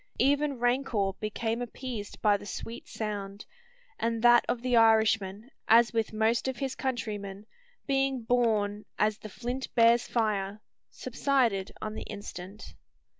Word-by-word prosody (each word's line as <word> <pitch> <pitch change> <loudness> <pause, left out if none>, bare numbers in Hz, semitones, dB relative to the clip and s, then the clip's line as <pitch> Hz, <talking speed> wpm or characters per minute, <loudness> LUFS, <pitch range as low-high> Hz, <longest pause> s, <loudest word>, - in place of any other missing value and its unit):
Even 285 0 +2
rancour 240 -5 +1
became 225 +2 -2
appeased 240 -3 -6
by 210 -2 +5
the 205 - -6
sweet 230 +4 -7
sound; 205 -1 -5 0.5
and 230 0 -1
that 240 0 +7
of 240 - -1
the 250 -1 +2
Irishman, 220 -1 +3 0.2
as 235 +1 +6
with 225 -1 0
most 220 +3 +1
of 260 - -2
his 270 -2 -2
countrymen, 210 -6 -4 0.4
being 270 -2 0
born 215 -3 +1
"as 215 0 +1
the 215 - -9
flint 245 +5 -4
bears 235 +1 +5
fire," 210 -3 -1 0.3
subsided 235 -9 0
on 215 0 -3
the - - -6
instant. 205 -1 -8
225 Hz, 135 wpm, -29 LUFS, 210-245 Hz, 0.5 s, that